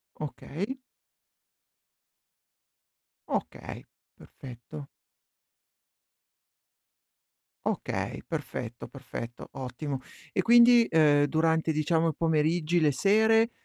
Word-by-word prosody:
Okay. 180 Hz, -, -5 dB, 2.5 s
Okay, -, -, -5 dB, 0.3 s
perfetto. 120 Hz, -, -11 dB, 2.8 s
Okay, -, -, -3 dB
perfetto, -, -, -6 dB
perfetto, 120 Hz, +1 st, -8 dB
ottimo. 135 Hz, +2 st, -5 dB, 0.3 s
E -, -, +1 dB
quindi, 235 Hz, 0 st, +7 dB
ehm, 150 Hz, -4 st, +4 dB
durante 160 Hz, +1 st, +1 dB
diciamo 160 Hz, +2 st, +1 dB
i 155 Hz, -, -4 dB
pomeriggi, 160 Hz, +1 st, +1 dB
le 150 Hz, -3 st, +3 dB
sere, 220 Hz, -, +3 dB
160 Hz, 70 wpm, -28 LUFS, 145-195 Hz, 2.8 s, quindi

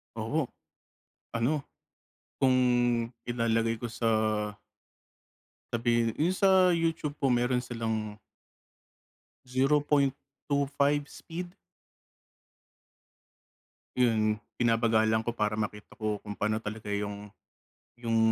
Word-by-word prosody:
Oo, 125 Hz, +6 st, -1 dB, 0.8 s
ano, 135 Hz, +6 st, 0 dB, 0.8 s
kung 130 Hz, -2 st, +4 dB, 0.7 s
ilalagay 115 Hz, -1 st, 0 dB
ko 120 Hz, -, -3 dB
sa 115 Hz, 0 st, -1 dB, 1.6 s
sabihin 115 Hz, -1 st, +1 dB
yun 170 Hz, +4 st, +2 dB
sa 185 Hz, -1 st, +5 dB
YouTube 165 Hz, -3 st, 0 dB
po 140 Hz, -, +2 dB
meron 125 Hz, 0 st, +2 dB
silang 110 Hz, -3 st, -3 dB, 1.3 s
0.25 140 Hz, +1 st, +1 dB
speed. 175 Hz, +1 st, -7 dB, 2.4 s
Yun, 110 Hz, -3 st, +2 dB, 0.2 s
binabagalan 110 Hz, -1 st, +3 dB
ko 120 Hz, -, -1 dB
para 105 Hz, -2 st, 0 dB
makita 105 Hz, -1 st, -5 dB
ko 105 Hz, -2 st, -2 dB
kung 105 Hz, -1 st, -7 dB
paano 110 Hz, +1 st, 0 dB
talaga 105 Hz, -1 st, -6 dB
yung 100 Hz, 0 st, -4 dB, 0.7 s
yung 115 Hz, -2 st, 0 dB
120 Hz, 85 wpm, -29 LUFS, 110-140 Hz, 2.4 s, sa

